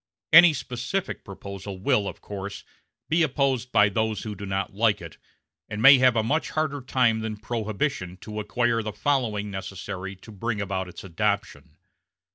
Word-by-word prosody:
Any 165 0 +10
specific 130 +8 -3
proposal 100 0 -8
will, 105 -1 +2
of - - -7
course, 100 0 -7 0.4
be 165 +2 +2
opposed 135 -4 +1
by 105 -3 +5
those 110 0 -1
who 110 - -4
do 100 0 -7
not 95 0 -2
like 105 +1 +2
it, 85 -1 -11 0.5
and 105 0 -4
may 135 +3 +9
have 130 -2 +5
a 110 - +2
much 150 +8 0
harder 155 -3 -1
time 125 -3 +2
than 110 -1 -4
Prohibition 110 -3 -3
to 105 -1 -6
acquire 115 +2 0
the 105 -1 -5
following 105 -5 0
necessary 95 0 -6
to 95 +4 -14
bring 110 +2 -3
about 95 -2 -2
its 90 - -10
adoption. 100 +3 -2
110 Hz, 165 wpm, -25 LUFS, 100-125 Hz, 0.5 s, Any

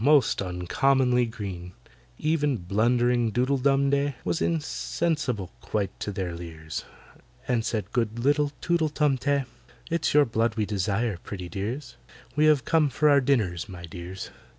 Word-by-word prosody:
most 145 -4 +4
uncommonly 125 +8 +2
green!" 95 -6 -6 0.5
Even 150 -4 +1
blundering 120 +5 +2
DOODLE 130 +4 +1
DUM 140 +1 +3
DEY 140 -1 +1
Was - - 0
insensible 150 - -1
quite 100 -3 -2
to 105 - -3
their 95 -3 -3
leers, 80 -2 -6 0.6
And 120 -3 +1
said 110 -3 -2
good 115 -2 0
little 145 +4 +2
TOOTLE 170 -2 +1
TUM 145 -3 +1
TEH, 140 0 +1 0.5
"It's 170 -1 +1
your 150 -1 +7
blood 115 -1 0
we 110 -2 0
desire, 100 +1 -1
pretty 90 -3 -7
dears— 115 +8 -5 0.4
We 150 +1 +4
have 150 -3 +4
come 160 -3 +3
for 150 +3 +3
our 140 -1 +6
dinners, 110 - 0
my 90 -2 -8
dears!" 90 +2 -7
120 Hz, 150 wpm, -26 LUFS, 100-140 Hz, 0.6 s, your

